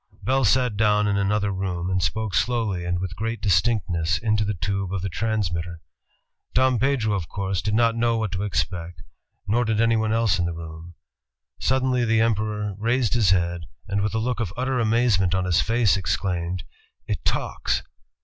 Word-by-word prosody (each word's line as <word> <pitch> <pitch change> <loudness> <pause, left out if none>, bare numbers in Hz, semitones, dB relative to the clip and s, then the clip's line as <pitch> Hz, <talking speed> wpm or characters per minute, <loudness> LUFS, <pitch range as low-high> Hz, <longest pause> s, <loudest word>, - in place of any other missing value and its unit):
Bell 135 0 +2
sat 125 0 +2
down 105 -1 +3
in 100 - +1
another 100 +1 +1
room 90 -2 -3
and 95 0 +1
spoke 110 +4 -1
slowly 110 -8 0
and 90 0 0
with 90 0 -4
great 115 +3 -3
distinctness 90 -4 +1
into 105 -2 +1
the 105 0 -2
tube 95 +1 -2
of 95 -2 -3
the 95 - -1
transmitter. 85 -5 -2 0.8
Dom 130 -2 +3
Pedro, 125 -4 +1
of 95 -5 -2
course, 95 -3 -2
did 105 +3 -1
not 115 0 +3
know 115 0 +1
what 110 -3 -2
to 95 -1 -3
expect, 90 -4 -3 0.4
nor 115 +5 +2
did 110 -2 0
anyone 115 -1 +2
els^in 110 -5 +2
the 85 - -2
room. 80 +1 -9 0.6
Sud 130 0 +1
denly 125 -2 +1
the 115 -1 +2
Emperor 105 -2 0
raised 115 +1 +1
his 115 -6 +3
head 85 -2 +1 0.2
and 100 +1 0
with 105 +2 -1
a - - +2
look 125 +3 -1
of 105 -7 -2
utter 130 0 0
amazement 110 -5 +2
on 95 -1 0
his 90 -3 +3
face 115 -3 +2
ex 95 +1 0
claimed, 90 -2 -3 0.2
" - - -46
It - - -3
talks!" - - -1
105 Hz, 190 wpm, -24 LUFS, 90-115 Hz, 0.8 s, down